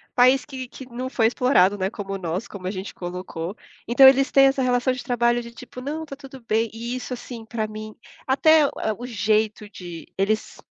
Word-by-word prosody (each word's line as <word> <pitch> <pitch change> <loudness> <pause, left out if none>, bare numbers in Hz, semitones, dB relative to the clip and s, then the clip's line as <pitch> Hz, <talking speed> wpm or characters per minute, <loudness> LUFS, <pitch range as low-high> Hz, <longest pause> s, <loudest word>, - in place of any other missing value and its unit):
país 255 +1 +5
que 260 -2 -7
que 265 - -11
não 255 +2 -4
foi 235 -4 +1
explorado, 225 -6 +3
né, 190 0 -1
como 195 -3 -5
nós, 180 +4 -3
como 185 -3 -7
a - - -1
gente 190 0 -6
colocou. 175 0 -6 0.3
Então 255 +3 +8
eles 270 +1 +5
têm 275 0 +7
essa 270 0 +2
relação 250 0 +2
de 255 - -6
trabalho 240 0 +1
de 235 0 -10
tipo: 250 +1 -10
"Não, 305 +4 -4
tá 280 - -8
tudo 270 -2 -12
bem". 225 +1 +1
E 235 +2 -5
isso 255 0 -5
assim 240 -2 -8
pra 220 -1 -3
mim, 215 0 -8 0.3
até 305 +3 +5
o - - -5
a 220 - -1
o 245 - -6
jeito 215 -1 0
de 175 -4 -9
eles 215 +3 -1
235 Hz, 215 wpm, -23 LUFS, 205-260 Hz, 0.3 s, Então